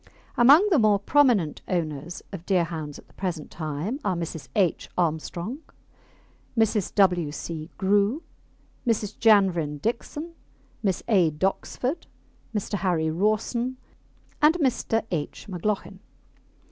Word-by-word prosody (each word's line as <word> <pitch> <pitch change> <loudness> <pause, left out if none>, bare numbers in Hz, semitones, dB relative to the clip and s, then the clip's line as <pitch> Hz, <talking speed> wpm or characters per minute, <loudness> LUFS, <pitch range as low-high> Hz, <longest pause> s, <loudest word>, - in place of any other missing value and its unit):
Among 285 +11 +7
the 325 - +5
more 215 -2 +4
prominent 210 - +3
owners 160 -2 -3
of 190 -4 -7
Deerhounds 165 -6 -1
at - - -16
the - - -24
present 175 -5 -4
time 160 - -3
are 190 -3 0
Mrs. 165 -2 -5
H. 190 -6 +1
Armstrong, 170 - -1 1.0
Mrs. 220 -3 +1
W. 180 -6 +3
C. 160 +1 -6
Grew, 205 - +2 0.6
Mrs. 215 -2 0
Janvrin 185 -9 +4
Dickson, 295 - -3 0.5
Miss 195 -4 0
A. 190 -8 +4
Doxford, 195 - -2 0.4
Mr. 210 -2 -2
Harry 170 -4 +1
Rawson, 215 +7 0 0.6
and 305 +2 +6
Mr. 250 -7 0
H. 155 -4 -3
McLauchin. 195 +1 -3
195 Hz, 115 wpm, -26 LUFS, 165-225 Hz, 1.0 s, Among